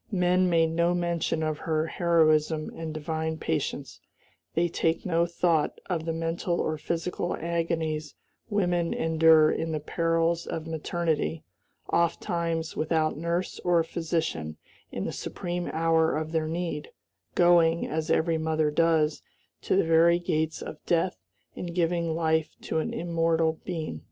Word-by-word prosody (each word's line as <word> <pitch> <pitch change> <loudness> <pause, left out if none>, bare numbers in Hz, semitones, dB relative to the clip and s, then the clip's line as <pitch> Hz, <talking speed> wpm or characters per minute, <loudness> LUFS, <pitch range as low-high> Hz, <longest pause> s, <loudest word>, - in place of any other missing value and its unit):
Men 180 -1 +3
make 165 -1 +3
no 170 +2 +2
mention 170 -2 -1
of 155 -1 -2
her 155 -1 0
heroism 160 -2 +2
and 160 -1 -5
divine 160 +1 -3
patience; 150 -3 -3 0.6
they 170 +1 +3
take 165 0 -1
no 170 -2 +2
thought 170 -2 +1
of 165 -2 -1
the 165 - -1
mental 165 +2 -2
or 155 - 0
physical 170 +3 -2
agonies 165 -3 -2 0.3
women 175 -5 +1
endure 160 -1 +5
in 165 0 -2
the 155 - -1
perils 165 +2 0
of 160 - -4
maternity, 160 0 -2 0.5
ofttimes 170 -1 0
without 155 0 +1
nurse 170 +4 -2
or 175 -2 +2
physician 160 - -3 0.3
in - - -3
the - - -2
supreme 175 0 -4
hour 160 -1 +2
of 155 0 -3
their 160 -1 0
need, 165 -2 -3 0.5
going, 170 -1 +4
as 160 +1 -3
every 165 0 +2
mother 155 -1 +1
does, 160 -1 +2 0.4
to - - 0
the 195 - +4
very 165 +1 +5
gates 160 -2 -1
of 155 - -9
death 175 +2 +1 0.4
in 180 - -5
giving 170 -2 0
life 160 -1 0
to 160 - -1
an - - -2
immortal 165 -1 0
being!" 160 - -4
165 Hz, 140 wpm, -27 LUFS, 160-170 Hz, 0.6 s, endure